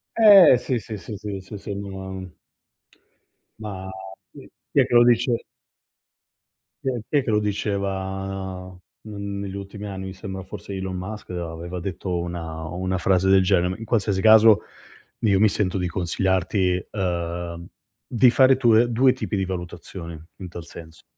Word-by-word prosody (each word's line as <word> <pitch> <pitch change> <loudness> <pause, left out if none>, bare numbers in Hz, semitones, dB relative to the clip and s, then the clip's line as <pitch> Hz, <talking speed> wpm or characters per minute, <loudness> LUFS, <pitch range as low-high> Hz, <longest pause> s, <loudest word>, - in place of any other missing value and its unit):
Eh, 200 - +8
sì, 125 +1 -2
sì, 110 +1 -7
sì, 105 0 -8
sì, 100 -1 -5
sì, 95 +2 -9
sono 100 0 -6
una 95 -1 -7 1.3
Ma 95 -3 -6 0.4
chi - - -13 0.2
chi - - +3
è - - +5
che - - -4
lo 120 - +8
dice? 120 0 +2 1.4
Chi 135 - 0
è 125 -2 -2
chi 145 - +1
è 135 - -2
che - - -4
lo 105 - +3
diceva 95 -2 -3 0.4
n 100 -2 -5
negli 100 -1 -5
ultimi 100 +1 -7
anni? 95 -1 -6
Mi 95 - -6
sembra 95 0 -7
forse 100 +1 -8
Elon 95 -1 -4
Musk 105 +4 -7
aveva 85 0 -5
detto 90 0 -3
una 85 -2 -5
o 80 - -7
una 95 +1 -1
frase 95 +1 +2
del 95 0 +6
genere. 95 -1 +1
In 115 - -7
qualsiasi 105 -4 0
caso 110 0 +7 0.6
io 100 -4 +2
mi 110 - +6
sento 100 -2 -1
di 90 -1 -1
consigliarti, 90 +1 0
ehm, 85 -2 -3 0.4
di 125 +1 +4
fare 130 0 +5
tue 120 -2 +4
2 130 +2 +4
tipi 115 -5 -3
di 95 - 0
valutazione 85 -2 -7
in 90 -2 -7
tal 85 -1 -8
senso, 80 -1 -12
95 Hz, 165 wpm, -23 LUFS, 90-105 Hz, 1.4 s, Eh